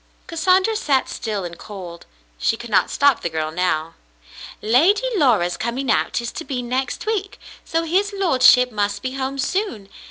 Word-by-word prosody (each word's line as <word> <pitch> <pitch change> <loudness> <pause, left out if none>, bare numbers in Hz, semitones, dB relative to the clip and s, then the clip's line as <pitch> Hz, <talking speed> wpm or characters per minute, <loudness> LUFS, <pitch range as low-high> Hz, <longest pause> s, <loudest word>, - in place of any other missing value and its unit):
Cassandra 370 +6 +2
sat 285 - +1
still 210 -4 -4
and 170 -1 -8
cold. 180 -5 -9 0.3
She 225 - +1
could 235 -1 -9
not - - +3
stop 285 -3 +3
the 170 - -2
girl 155 -1 -3
now. 165 -2 -1 0.7
"Lady 325 - +3
Laura's 225 - +2
coming 235 +2 -2
out - - +1
is 235 - -4
to 355 - -6
be 255 -5 -4
next 255 - -3
week, 410 -3 -2 0.3
so 330 0 -1
his 380 +5 +1
lordship 260 -10 +4
must 205 -1 -2
be 255 - -2
home 270 0 -3
soon. 270 - -2
255 Hz, 165 wpm, -21 LUFS, 205-330 Hz, 0.7 s, lordship